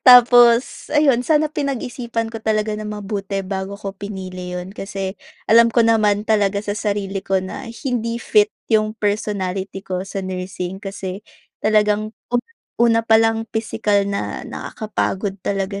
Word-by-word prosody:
Tapos 245 0 +6
ayun, 280 -5 +4
sana 310 +2 +3
pinag-isipan 245 -5 -3
ko 220 - -6
talaga 215 -1 0
nang 210 0 -5
mabuti 200 -1 -3
bago 195 +1 -4
ko 200 -1 -6
pinili 185 -3 -6
'yon 185 +3 -8
kasi, 195 -1 -4 0.3
alam 230 +1 +6
ko 230 -1 +4
naman 210 -2 +3
talaga 205 -2 +2
sa 205 0 -3
sarili 200 -2 -2
ko 190 0 +1
na 190 +5 -6
hindi 235 -2 -2
fit 420 - +3 0.2
'yong 215 0 +2
personality 195 -2 -2
ko 185 -1 -3
sa 195 - -5
nursing. 185 0 -4
Kasi, 195 0 -5 0.4
talagang 215 0 +2 0.2
u - - +4 0.4
una 230 -1 +5
pa 225 0 +5
lang, 225 0 +2
pisikal 215 -2 +1
na 200 0 -3
nakakapagod 205 -2 -3
talaga 195 0 -2
210 Hz, 145 wpm, -20 LUFS, 195-230 Hz, 0.4 s, Tapos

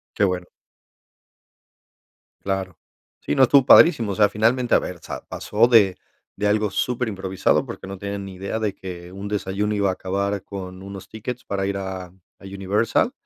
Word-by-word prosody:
Qué 100 - +3
bueno. 90 -2 -1 1.9
Claro. 95 -2 -3 0.4
Sí, - - -2
no, 135 - +4
estuvo 130 +1 +5
padrísimo, 120 - +7
o - - -3
sea, 105 +1 +4
finalmente, 115 +4 +2
a - - +6
ver, 90 - -5
sa - - -7
pasó 110 +3 +1
de 105 -6 +5 0.4
de 105 - -1
algo 105 0 +2
súper 125 +4 -1
improvisado, 95 -2 0
porque - - -8
no 95 0 -7
tienen 100 0 -5
ni 95 -1 -8
idea 100 +4 -4
de 105 -2 0
que 90 -2 -9
un 100 +2 -7
desayuno 105 0 -1
iba 100 -1 +1
a - - -1
acabar 100 +1 -2
con 95 -2 -8
unos 100 -1 -9
tickets 120 +3 -6
para 100 -1 -2
ir 100 0 -2
a 95 -2 -5 0.3
a - - -16
Universal, 100 - 0
100 Hz, 175 wpm, -23 LUFS, 95-105 Hz, 1.9 s, padrísimo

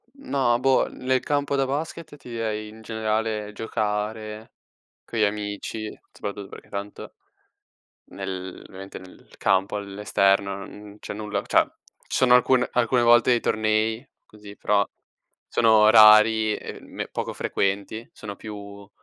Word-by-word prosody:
No, 135 - 0
boh, 135 0 +3
nel 130 0 -1
campo 145 -1 0
da 135 -1 +2
basket 150 +3 -5
ti 135 -3 -13
direi, 110 -2 -3
in 110 +1 -13
generale, 110 -1 -2
giocare 110 0 -3 0.5
con 115 - -5
gli 110 - +4
amici, 105 +1 -3 0.2
soprattutto 100 -1 -6
perché - - -12
tanto, 100 0 -7 1.0
nel 95 -1 -6
ovviamente 95 +1 -9
nel 95 0 -16
campo 95 +1 +1
all'esterno 100 -1 +1
non 105 0 -12
c'è - - -6
nulla, 105 0 -3
cioè, - - +4 0.4
ci - - -3
sono 125 -1 +5
alcune 125 0 +3
alcune 120 0 +2
volte 120 +1 +5
dei 120 -1 +4
tornei 110 +3 0 0.2
così, 105 -1 -13
però 100 0 +1 0.6
sono 110 -2 +5
rari 110 0 +7
e - - -8
me - - -7
poco - - -4
frequenti, 100 +3 -2
sono 100 -2 -8
più, 100 -2 -9
110 Hz, 135 wpm, -24 LUFS, 100-115 Hz, 1.0 s, rari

